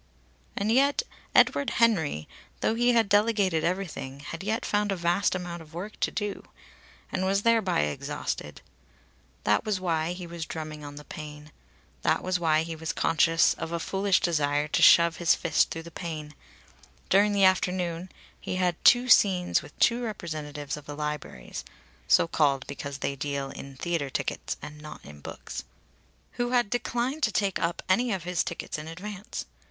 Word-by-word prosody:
And 205 +2 +1
yet 280 - +3 0.3
Edward 280 - +5
Henry, 165 - +2 0.3
though - - +2
he 240 +2 +3
had 230 -3 +4
delegated 205 -5 +2
everything, 170 -7 -3
had 165 +4 -7
yet 220 +3 -1
found 205 -1 +1
a - - +1
vast 175 +3 +1
amount 175 -2 -5
of 160 0 -14
work 200 +5 -6
to - - +1
do; 205 -2 -4 0.7
and 185 - -1
was 195 +1 +1
thereby 225 - +3
exhausted. 75 0 -4 0.8
That 105 - +3
was 210 -3 -1
why 165 -2 0
he 180 0 -7
was 170 -1 -6
drumming 155 -2 -6
on 145 0 -8
the 150 - -9
pane. 150 -2 -9 0.5
That - - +1
was 185 0 0
why 160 -2 +3
he 165 0 -5
was 160 0 -4
conscious 165 +1 +3
of 165 - -6
a 170 - -1
foolish 195 +2 +1
desire 150 -3 +1
to - - +1
shove 170 0 +7
his 170 -2 +4
fist 160 -3 +2
through 165 - -5
the 170 - -11
pane. 155 -3 -6 0.8
During 205 +2 +5
the 200 -1 +2
afternoon 180 -1 +1 0.3
he - - -4
had 185 0 +1
had - - -29
two 245 +1 +6
scenes 185 -6 +4
with - - -14
two 240 +1 +3
representatives 155 - -5
of 150 - -12
the 145 - -6
Libraries 150 - -5 0.4
(so - - +5
called 140 -5 +2
because 140 0 -6
they 140 0 -2
deal 140 0 -3
in 140 0 -9
theatre 160 0 -2
tickets - - -3
and 150 0 -9
not 150 0 -10
in 75 0 -12
books) - - -7 0.8
who 240 - 0
had 240 -5 +2
declined 245 +4 -1
to 215 - +2
take 200 -3 0
up 170 +1 -1
any 235 +6 +2
of 190 -4 -2
his 180 -1 0
tickets 170 - -5
in 155 - -8
advance. 195 +5 -6
170 Hz, 175 wpm, -27 LUFS, 150-200 Hz, 0.8 s, shove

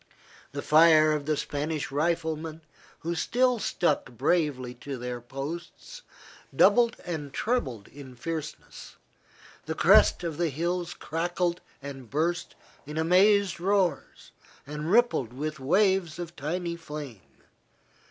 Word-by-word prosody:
The - - -4
fire 155 0 +6
of 150 -1 -2
the 155 -1 +1
Spanish 150 +1 -3
riflemen, 160 +1 -1 0.4
who 170 +2 -2
still 245 +8 +1
stuck 170 -7 0
bravely 130 0 0
to 140 -2 -5
their 125 0 -5
posts, 155 - -7 0.5
doubled 240 -1 +5
and 155 -5 -4
trebled 135 - -2
in 135 -3 -12
fierceness, 155 +4 -7 0.7
the - - -2
crests - - +5
of 165 -3 -3
the 170 -2 +2
hills 175 +4 -2
crackled 175 +1 -2 0.2
and 135 -4 -8
burst 165 +6 -1 0.3
in 150 +1 -6
amazed 185 +3 +4
roars, 190 0 -1 0.3
and 150 +2 -5
rippled 225 - +3
with 155 +3 -4
waves 180 +2 +2
of 170 -1 -7
tiny 170 +4 -3
flame. 150 - -10
160 Hz, 120 wpm, -27 LUFS, 145-175 Hz, 0.7 s, fire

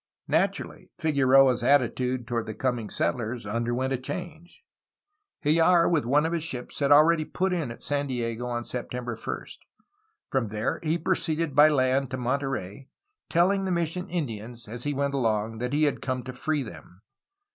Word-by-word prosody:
Naturally, - - -1
Figueroa' 135 -3 +5
s 120 - -4
attitude 125 -1 +2
toward 115 -2 -2
the 110 - -5
coming 120 -3 -2
settlers 120 0 -2
underwent 120 +5 -1
a 130 - -1
change. 175 +3 -7 0.8
Hljar, 165 +3 +4
with 155 -7 +2
one 145 +4 +3
of 165 - -1
his 165 -2 -1
ships, 125 -6 -5
had 140 -1 +1
already 155 +2 +6
put 185 +4 -1
in 165 -8 -1
at 115 - -9
San 145 0 0
Diego 120 -2 -3
on 120 -1 -2
September 125 -1 -4
1st. 110 - -6 0.7
From 130 -4 +1
there 105 +1 -2
he 160 +1 0
proceeded 165 -3 -1
by 150 +3 +7
land 135 -1 +2
to 130 - -4
Monterey, 130 -3 -3 0.4
telling 190 +3 +2
the 190 - -1
mission 175 +2 -2
Indians, 120 -8 -5
as 120 +4 -6
he 145 - 0
went 140 0 0
along, 110 -4 0
that 125 +1 -2
he 150 +2 +2
had 145 -3 +1
come 130 -1 -2
to 130 +1 -7
free 150 +3 -1
them. 90 - -12
135 Hz, 170 wpm, -27 LUFS, 120-155 Hz, 0.8 s, by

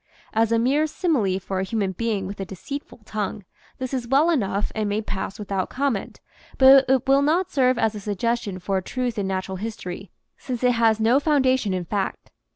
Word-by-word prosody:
As 225 0 +2
a 230 - +4
mere 275 +7 +2
simile 265 - 0
for 190 0 -4
a - - 0
human 200 -1 -1
being 210 0 -2
with 200 +2 -7
a - - -2
deceitful 235 - -8
tongue, 210 -2 -4 0.3
this 260 0 -5
is 250 -3 -2
well 285 +7 +4
enough 205 - 0
and 215 -1 -1
may 205 +1 0
pass 195 -2 -4
without 195 -2 -3
comment, 260 -6 -2 0.4
but 265 0 +7
it 265 -1 +2
will 275 +1 +5
not 335 +6 +1
serve 255 -2 +3
as 220 -2 +1
a 210 - -6
suggestion 210 0 -2
for 190 +1 -1
a - - -7
truth 245 +3 -3
in 195 - -1
natural 190 0 -3
history, 200 -3 -6 0.3
since 250 -2 -5
it 250 - +5
has 225 -2 +3
no 230 +5 +4
foundation 260 -7 +2
in 185 -1 -2
fact. 195 +2 -3
225 Hz, 200 wpm, -23 LUFS, 195-260 Hz, 0.4 s, but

